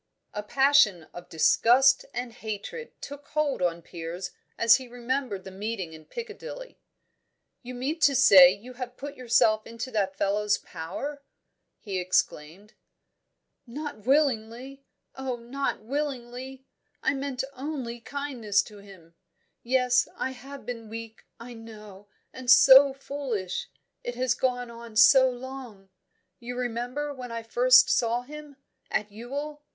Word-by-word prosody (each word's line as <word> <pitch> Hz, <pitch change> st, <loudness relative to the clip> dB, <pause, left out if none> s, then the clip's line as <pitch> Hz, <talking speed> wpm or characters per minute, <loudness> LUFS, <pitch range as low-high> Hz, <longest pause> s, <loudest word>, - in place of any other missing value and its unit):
A 210 Hz, -, -3 dB
passion 265 Hz, -, +4 dB
of 175 Hz, 0 st, -10 dB
disgust 245 Hz, -, +4 dB
and 245 Hz, -1 st, -5 dB
hatred 220 Hz, -, -7 dB
took 285 Hz, 0 st, -9 dB
hold 300 Hz, -7 st, -1 dB
on 170 Hz, -1 st, -1 dB
Piers 175 Hz, +2 st, -6 dB, 0.3 s
as 230 Hz, -1 st, +6 dB
he 260 Hz, -1 st, -10 dB
remembered 245 Hz, -4 st, -3 dB
the 190 Hz, -, -9 dB
meeting 195 Hz, -3 st, -5 dB
in 155 Hz, -1 st, -13 dB
Piccadilly. 480 Hz, -, -8 dB, 0.8 s
"You 250 Hz, 0 st, -8 dB
mean 280 Hz, +7 st, -3 dB
to 285 Hz, -2 st, +4 dB
say 190 Hz, -9 st, +9 dB
you 215 Hz, +6 st, -9 dB
have 250 Hz, 0 st, -7 dB
put 285 Hz, 0 st, -7 dB
yourself 225 Hz, -3 st, +2 dB
into 230 Hz, +3 st, -6 dB
that 195 Hz, -4 st, -1 dB
fellow's 205 Hz, +1 st, +1 dB
power?" 275 Hz, -, -7 dB, 0.6 s
he 195 Hz, -3 st, -4 dB
exclaimed. 180 Hz, +1 st, -1 dB, 0.9 s
"Not 290 Hz, +1 st, -6 dB
willingly! 265 Hz, -1 st, 0 dB, 0.3 s
Oh, 265 Hz, -1 st, -4 dB
not 240 Hz, 0 st, -4 dB
willingly! 260 Hz, 0 st, -5 dB, 0.4 s
I -, -, +2 dB
meant 270 Hz, -2 st, -3 dB
only 260 Hz, -4 st, -5 dB
kindness 245 Hz, -6 st, -1 dB
to 210 Hz, -2 st, -13 dB
him. 190 Hz, -5 st, -16 dB, 0.5 s
Yes, 250 Hz, 0 st, +2 dB
I 260 Hz, -, -2 dB
have 270 Hz, 0 st, -11 dB
been 230 Hz, -2 st, -6 dB
weak, 225 Hz, 0 st, -9 dB
I 240 Hz, +1 st, -9 dB
know, 215 Hz, -3 st, -12 dB, 0.3 s
and 255 Hz, -1 st, -7 dB
so 270 Hz, +2 st, +9 dB
foolish! 265 Hz, -, -4 dB, 0.3 s
It 245 Hz, -, -5 dB
has 250 Hz, -1 st, +1 dB
gone 245 Hz, -2 st, -2 dB
on 235 Hz, -1 st, -11 dB
so 260 Hz, +3 st, +7 dB
long. 250 Hz, -6 st, -9 dB, 0.5 s
You 245 Hz, +1 st, -7 dB
remember 250 Hz, +4 st, -3 dB
when 250 Hz, -3 st, -8 dB
I 230 Hz, 0 st, -5 dB
first 250 Hz, +3 st, +6 dB
saw 240 Hz, 0 st, +1 dB
him, 295 Hz, +1 st, -11 dB, 0.3 s
at 210 Hz, 0 st, -2 dB
Ewell? 285 Hz, +7 st, -6 dB
245 Hz, 135 wpm, -27 LUFS, 215-270 Hz, 0.9 s, say